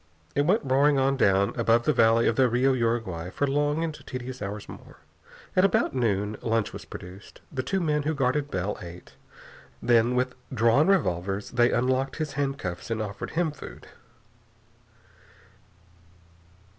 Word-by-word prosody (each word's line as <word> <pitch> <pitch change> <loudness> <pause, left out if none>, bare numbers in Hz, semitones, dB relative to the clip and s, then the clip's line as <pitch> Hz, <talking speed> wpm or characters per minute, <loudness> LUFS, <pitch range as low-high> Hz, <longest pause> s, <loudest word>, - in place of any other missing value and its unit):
It 145 +1 +1
went 195 +2 +3
roaring 140 +2 +3
on 135 +1 +2
down 100 -3 +2
above 115 0 +2
the - - +2
valley 115 +1 +4
of 115 - +2
the 130 0 +4
Rio 130 +3 +2
Uruguay 115 -9 -1
for 145 - -1
long 145 +3 0
and 165 -2 -2
tedious 130 0 -6
hours 100 +1 -5
more. - - -12 0.6
At 185 - +4
about 195 - +2
noon, 105 -4 0
lunch 115 -2 0
was - - -8
produced. 95 +2 -11
The 130 - -2
two 190 +8 -1
men 150 -4 +1
who 155 +2 -1
guarded 140 +2 0
Bell 95 0 -3
ate. 85 0 -11 0.7
Then, 120 0 +3
with 125 0 0 0.2
drawn 120 +5 +3
revolvers, 95 - 0
they 120 0 +3
unlocked 130 +2 0
his 155 -2 -4
handcuffs 135 -12 -3
and 115 -1 -2
offered 105 -1 -5
him 170 -3 +1
food. 145 - -11
125 Hz, 155 wpm, -26 LUFS, 110-145 Hz, 0.7 s, valley